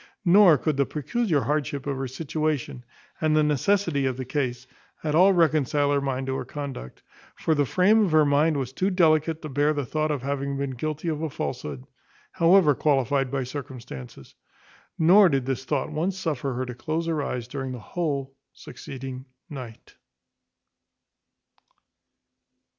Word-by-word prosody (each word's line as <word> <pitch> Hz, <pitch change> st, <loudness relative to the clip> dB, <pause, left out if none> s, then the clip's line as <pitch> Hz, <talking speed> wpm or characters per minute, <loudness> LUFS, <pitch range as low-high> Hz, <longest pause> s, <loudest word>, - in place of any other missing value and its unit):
Nor 180 Hz, -3 st, +7 dB
could 150 Hz, +2 st, -1 dB
the 140 Hz, -, +3 dB
peculiar 165 Hz, -, -1 dB
hardship 145 Hz, -1 st, -2 dB
of 140 Hz, -1 st, -2 dB
her 135 Hz, 0 st, -3 dB
situation, 150 Hz, -1 st, -3 dB, 0.4 s
and 155 Hz, -1 st, +2 dB
the 155 Hz, -, +4 dB
necessity 150 Hz, 0 st, +1 dB
of 130 Hz, -1 st, -2 dB
the 130 Hz, -, -4 dB
case, 125 Hz, -2 st, -2 dB, 0.4 s
at 150 Hz, -2 st, -1 dB
all 185 Hz, +5 st, +6 dB
reconcile 150 Hz, -5 st, +2 dB
her 140 Hz, -1 st, +2 dB
mind 135 Hz, -1 st, -2 dB
to 135 Hz, 0 st, -2 dB
her -, -, -3 dB
conduct; 140 Hz, -, -7 dB, 0.3 s
for 160 Hz, -, 0 dB
the 145 Hz, -3 st, +1 dB
frame 210 Hz, -, +4 dB
of 180 Hz, -, -2 dB
her 155 Hz, -1 st, +5 dB
mind 145 Hz, +2 st, +2 dB
was 130 Hz, -2 st, -4 dB
too 185 Hz, +7 st, 0 dB
delicate 160 Hz, -3 st, +2 dB
to 155 Hz, -, -5 dB
bear 145 Hz, +3 st, +1 dB
the 145 Hz, -2 st, -2 dB
thought 155 Hz, +5 st, -1 dB
of 145 Hz, -4 st, -2 dB
having 140 Hz, 0 st, -2 dB
been 140 Hz, -1 st, -2 dB
guilty 155 Hz, +5 st, -4 dB
of 155 Hz, -2 st, -2 dB
a 160 Hz, -, -2 dB
falsehood, 75 Hz, -, -5 dB, 0.5 s
however 170 Hz, -2 st, +5 dB
qualified 135 Hz, -1 st, +1 dB
by 135 Hz, 0 st, -2 dB
circumstances. 125 Hz, -, -9 dB, 0.6 s
Nor 185 Hz, +4 st, +6 dB
did 135 Hz, -4 st, 0 dB
this 130 Hz, 0 st, -3 dB
thought 140 Hz, -2 st, -1 dB
once 180 Hz, +5 st, -2 dB
suffer 145 Hz, -7 st, -2 dB
her 130 Hz, +1 st, -2 dB
to 125 Hz, -, -6 dB
close 155 Hz, +7 st, -3 dB
her 160 Hz, -3 st, -1 dB
eyes 125 Hz, -4 st, -4 dB
during 135 Hz, 0 st, -5 dB
the 125 Hz, -, -5 dB
whole 140 Hz, +1 st, -3 dB, 0.2 s
succeeding 130 Hz, 0 st, -9 dB, 0.3 s
night. 125 Hz, -6 st, -10 dB
145 Hz, 165 wpm, -25 LUFS, 130-155 Hz, 0.6 s, Nor